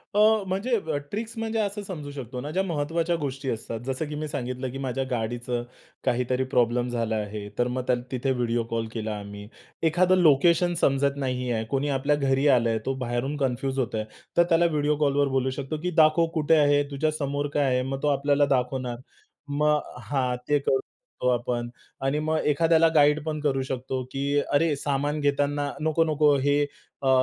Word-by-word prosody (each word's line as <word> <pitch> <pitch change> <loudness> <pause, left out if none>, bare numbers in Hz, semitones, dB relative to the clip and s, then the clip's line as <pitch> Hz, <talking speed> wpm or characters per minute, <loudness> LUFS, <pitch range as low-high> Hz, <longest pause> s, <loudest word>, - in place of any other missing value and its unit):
अ, 210 - +4 0.3
म्हणजे 205 +6 0 0.3
ट्रिक्स 225 +2 -4
म्हणजे 225 0 -2
असं 205 0 -1
समजू 155 -7 -6
शकतो 130 -3 -6
ना 145 - -5
ज्या 190 +4 +1
महत्वाच्या 165 0 -1
गोष्टी 135 -2 -4
असतात. 115 0 -4
जसं 135 +4 -2
की 150 - -5
मी 155 +1 -3
सांगितलं, 130 -3 -4
की 135 - -6
माझ्या 135 0 -2
गाडीचं 120 +1 -2 0.4
काहीतरी 125 +1 +1
प्रॉब्लेम 120 0 +2
झाला 115 -2 -1
आहे. 105 -1 -4
तर 120 - +2
मग 125 +1 -2
त्याल 125 -1 +2
तिथे 130 +1 -1
व्हिडिओ 120 -2 0
कॉल 115 -1 -1
केला 110 -2 -3
आम्ही, 100 0 -9 0.4
एखादं 175 +3 +4
लोकेशन 170 +3 +4
समजत 140 +1 +2
नाही 125 -1 -2
आहे. 110 -1 0
कोणी 140 +1 0
आपल्या 140 +2 +1
घरी 135 0 +1
आलंय 115 -1 +1
तो 135 - 0
बाहेरून 120 +5 -2
कन्फ्यूज 135 0 -1
होतो 120 -3 -1
आहे. 110 - -2 0.3
तर 170 - +7
त्याला 170 +1 +4
व्हिडिओ 150 -2 +1
कॉलवर 140 0 +2
बोलू 130 0 +1
शकतो, 140 +3 -3
की 180 - 0
"दाखव 155 +2 +4
कुठे 160 0 +3
आहे? 145 -1 +4
तुझ्या 155 +3 0
समोर 145 -1 -2
काय 145 - +2
आहे?" 125 -1 +2
मग 135 +1 -4
तो - - +2
आपल्याला 145 0 +3
दाखवणार. 125 -2 -1 0.5
मग 150 +1 +2 0.2
हां 130 -3 0
ते 145 - +4
करू 135 -1 +1
शकतो - - -5
आपण 120 -1 -1 0.4
आणि 145 +3 +1
मग 155 +1 0
एखाद्याला 165 +2 +4
गाईड 150 0 +4
पण 155 -1 -2
करू 135 -3 +1
शकतो, 130 0 -3
की 140 +1 -1
अरे 150 +1 +3
सामान 145 +2 -1
घेताना, 145 0 0
नको-नको 155 -2 +3
हे 145 +1 +3 0.4
अ, 135 - +2
140 Hz, 185 wpm, -26 LUFS, 125-150 Hz, 0.5 s, तर